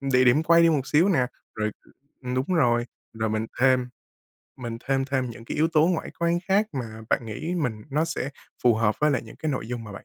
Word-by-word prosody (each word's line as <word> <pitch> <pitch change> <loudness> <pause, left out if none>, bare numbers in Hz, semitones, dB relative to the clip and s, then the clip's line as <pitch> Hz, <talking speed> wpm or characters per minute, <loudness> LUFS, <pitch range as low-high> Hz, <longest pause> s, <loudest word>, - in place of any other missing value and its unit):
địa 130 -2 +3
điểm 130 +6 +5
quay 170 +1 +5
đi 165 - +6
một 140 -4 0
xíu 165 +6 +4
nè, 130 -10 +3 0.3
rồi 110 0 -1 0.5
ừm, 125 0 -3
đúng 130 +1 0
rồi. 120 -6 +3 0.3
Rồi 110 0 -2
mình 110 +1 -1
thêm 130 -1 +4 0.7
mình 120 -2 -5
thêm 135 -1 +2
thêm 130 -3 -1
những 115 0 -11
cái - - -5
yếu 160 +2 +3
tố 160 0 +4
ngoại 175 -3 -1
quan 170 0 +2
khác 200 +3 +3
mà 115 -5 -5
bạn 120 - +1
nghĩ 155 +11 -4
mình 125 -11 -2
nó 150 +4 +1
sẽ 165 -5 -3 0.3
phù 120 -2 +5
hợp 110 -1 +2
với 150 0 +4
lại 130 - 0
những 110 - -13
cái 155 - -2
nội 130 -5 -3
dung 120 -2 -4
mà 105 - -9
bạn - - -10
130 Hz, 240 wpm, -25 LUFS, 115-155 Hz, 0.7 s, đi